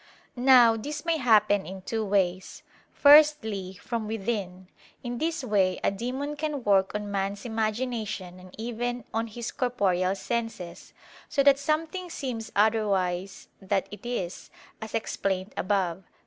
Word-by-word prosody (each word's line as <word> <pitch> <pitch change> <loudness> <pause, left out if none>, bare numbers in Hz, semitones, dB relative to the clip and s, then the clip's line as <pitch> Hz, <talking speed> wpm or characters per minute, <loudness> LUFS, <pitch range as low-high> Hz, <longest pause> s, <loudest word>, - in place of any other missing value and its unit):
Now 245 -3 +6
this 295 +7 -6
may 335 -1 +2
happen 215 -6 +3
in 190 0 -8
two 225 +2 -2
ways. 190 -3 -1 0.3
Firstly, 285 -11 +5
from 230 0 -4
within; 195 -4 -3 0.4
in 240 -1 -4
this 325 -1 -1
way 195 -6 +1
a - - +3
demon 255 +8 -4
can 295 -3 -3
work 195 -2 +3
on 210 -1 -3
man's 200 +2 -2
imagination 220 -4 -3
and 185 0 -14
even 240 +2 -3
on 225 +1 -1
his 230 +1 -6
corporeal 195 -7 0
senses, 210 -6 -5 0.4
so 275 - +2
that 275 -1 +6
something 320 +5 -2
seems 245 -8 -5
otherwise 200 -3 +1
that 195 0 -1
it 205 - -10
is, 220 -7 -4 0.3
as 220 - -6
explained 195 -3 -2
above 185 -3 0
(Q. 190 - -23
220 Hz, 140 wpm, -27 LUFS, 195-250 Hz, 0.4 s, Now